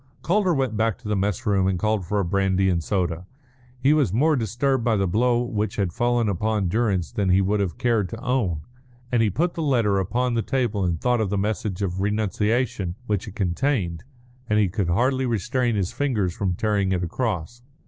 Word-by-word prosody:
Calder 185 Hz, +2 st, +2 dB
went 130 Hz, -5 st, 0 dB
back 110 Hz, -1 st, +1 dB
to -, -, -11 dB
the 105 Hz, -, 0 dB
mess 100 Hz, -1 st, -1 dB
room 95 Hz, -2 st, +2 dB
and 95 Hz, -1 st, +1 dB
called 105 Hz, -2 st, 0 dB
for 105 Hz, +2 st, 0 dB
a 100 Hz, -, 0 dB
brandy 95 Hz, +1 st, +1 dB
and 85 Hz, -2 st, 0 dB
soda. 90 Hz, -2 st, -2 dB, 0.5 s
He 135 Hz, +4 st, +4 dB
was 145 Hz, -, +2 dB
more 150 Hz, +9 st, +3 dB
disturbed 125 Hz, +2 st, 0 dB
by 115 Hz, -1 st, +2 dB
the 100 Hz, -1 st, +1 dB
blow 120 Hz, +6 st, +2 dB
which 110 Hz, -3 st, -2 dB
had 95 Hz, -5 st, -1 dB
fallen 120 Hz, 0 st, +1 dB
upon 105 Hz, 0 st, 0 dB
Durrance 100 Hz, -6 st, 0 dB
than 100 Hz, -2 st, -1 dB
he 90 Hz, +1 st, +5 dB
would 100 Hz, +2 st, +1 dB
have 95 Hz, -5 st, -2 dB
cared 115 Hz, -6 st, +1 dB
to 115 Hz, -, -7 dB
own; 115 Hz, -12 st, -1 dB, 0.5 s
and 120 Hz, -2 st, +3 dB
he 110 Hz, -, +3 dB
put 170 Hz, -, 0 dB
the 165 Hz, -, -4 dB
letter 115 Hz, -9 st, +2 dB
upon 120 Hz, +6 st, 0 dB
the 115 Hz, -, +1 dB
table 120 Hz, -6 st, -1 dB
and 85 Hz, -3 st, 0 dB
thought 125 Hz, +2 st, +1 dB
of 105 Hz, -, 0 dB
the 100 Hz, -, -1 dB
message 100 Hz, -1 st, -2 dB
of 95 Hz, 0 st, -2 dB
renunciation 105 Hz, -1 st, 0 dB
which 105 Hz, -3 st, -2 dB
it 100 Hz, -, -9 dB
contained, 95 Hz, -, -1 dB, 0.5 s
and 105 Hz, -, +2 dB
he 105 Hz, -3 st, +3 dB
could 95 Hz, -1 st, -1 dB
hardly 130 Hz, +8 st, +1 dB
restrain 120 Hz, +1 st, 0 dB
his 95 Hz, -3 st, -1 dB
fingers 110 Hz, -11 st, 0 dB
from 95 Hz, -3 st, -1 dB
tearing 100 Hz, -1 st, 0 dB
it 90 Hz, -1 st, -1 dB
across. 110 Hz, +3 st, -3 dB
105 Hz, 210 wpm, -24 LUFS, 95-120 Hz, 0.5 s, he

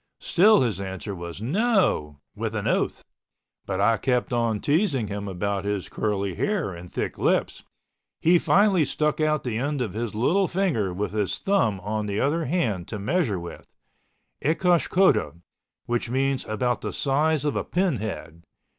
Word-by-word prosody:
Still 210 Hz, +2 st, +5 dB
his 110 Hz, -7 st, 0 dB
answer 95 Hz, +2 st, -5 dB
was 85 Hz, +2 st, -7 dB
NO, 175 Hz, -, +1 dB, 0.2 s
with -, -, -3 dB
an -, -, -2 dB
oath, -, -, 0 dB, 0.6 s
but 95 Hz, -, -2 dB
I 110 Hz, +3 st, +3 dB
kept 125 Hz, +2 st, 0 dB
on 115 Hz, -3 st, +1 dB
teasing 145 Hz, -, +1 dB
him 100 Hz, 0 st, -4 dB
about 100 Hz, +1 st, -2 dB
his 100 Hz, -2 st, -3 dB
curly 100 Hz, -3 st, -1 dB
hair 190 Hz, -, -1 dB
and 85 Hz, +1 st, -10 dB
thick -, -, -3 dB
lips. -, -, +1 dB, 0.6 s
He 175 Hz, +2 st, +4 dB
finally 195 Hz, -3 st, +4 dB
stuck 150 Hz, +2 st, 0 dB
out 155 Hz, -1 st, +1 dB
the 115 Hz, -3 st, -2 dB
end 145 Hz, +2 st, -1 dB
of 115 Hz, -7 st, -2 dB
his 115 Hz, 0 st, -4 dB
little 175 Hz, -, +2 dB
finger 165 Hz, -, 0 dB
with 100 Hz, +4 st, -3 dB
his 105 Hz, -2 st, -1 dB
thumb 190 Hz, -, +1 dB
on 105 Hz, +2 st, -2 dB
the 100 Hz, +1 st, -2 dB
other 155 Hz, +4 st, +1 dB
hand 115 Hz, -, -1 dB
to 110 Hz, -, -5 dB
measure 105 Hz, -, 0 dB
with—ecosh 165 Hz, -, -3 dB
cota, 190 Hz, +1 st, +3 dB, 0.5 s
which 120 Hz, 0 st, -1 dB
meant 135 Hz, +1 st, 0 dB
about 120 Hz, +3 st, -1 dB
the -, -, -4 dB
size 150 Hz, +2 st, +1 dB
of 145 Hz, -, 0 dB
a -, -, 0 dB
pin 180 Hz, -6 st, 0 dB
head. 95 Hz, -6 st, -6 dB
120 Hz, 165 wpm, -25 LUFS, 100-160 Hz, 0.6 s, Still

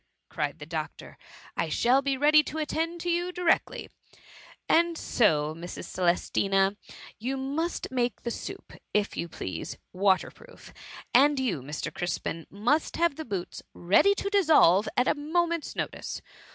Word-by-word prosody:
'' -, -, -53 dB
cried -, -, -2 dB
the -, -, -9 dB
doctor, -, -, -6 dB, 0.2 s
" -, -, -20 dB
I -, -, -1 dB
shall 255 Hz, +3 st, +3 dB
be 275 Hz, -1 st, -1 dB
ready 300 Hz, +2 st, +6 dB
to 315 Hz, -, -5 dB
attend 325 Hz, +2 st, -2 dB
to 350 Hz, -, -2 dB
you 350 Hz, +1 st, 0 dB
directly: 355 Hz, -2 st, 0 dB, 0.4 s
— -, -, -19 dB, 0.3 s
^and 335 Hz, 0 st, +3 dB
so, 155 Hz, -, +2 dB
Mrs. 170 Hz, +2 st, -7 dB
Celestina, 195 Hz, +2 st, +2 dB, 0.4 s
you 260 Hz, +5 st, -2 dB
must 285 Hz, +6 st, -3 dB
make 245 Hz, -4 st, -1 dB
the 235 Hz, -, -2 dB
soup, 390 Hz, +10 st, -7 dB, 0.2 s
if 210 Hz, 0 st, +1 dB
you 170 Hz, -, -3 dB
please, 95 Hz, -, -6 dB, 0.2 s
water 190 Hz, 0 st, +2 dB
proof; 485 Hz, 0 st, -16 dB, 0.4 s
and 280 Hz, +3 st, +5 dB
you, 230 Hz, -, -1 dB
Mr. 150 Hz, +2 st, -5 dB
Crispin, 165 Hz, -2 st, -3 dB
must 245 Hz, -, 0 dB
have 340 Hz, -3 st, +2 dB
the 315 Hz, -, -5 dB
boots 195 Hz, -5 st, -5 dB
ready 205 Hz, -, +4 dB
to 400 Hz, -, -2 dB
dissolve, 300 Hz, -, +5 dB
at 250 Hz, -, +3 dB
a -, -, +4 dB
moment's 335 Hz, +2 st, -1 dB
notice. -, -, -4 dB
265 Hz, 160 wpm, -28 LUFS, -, 0.4 s, ready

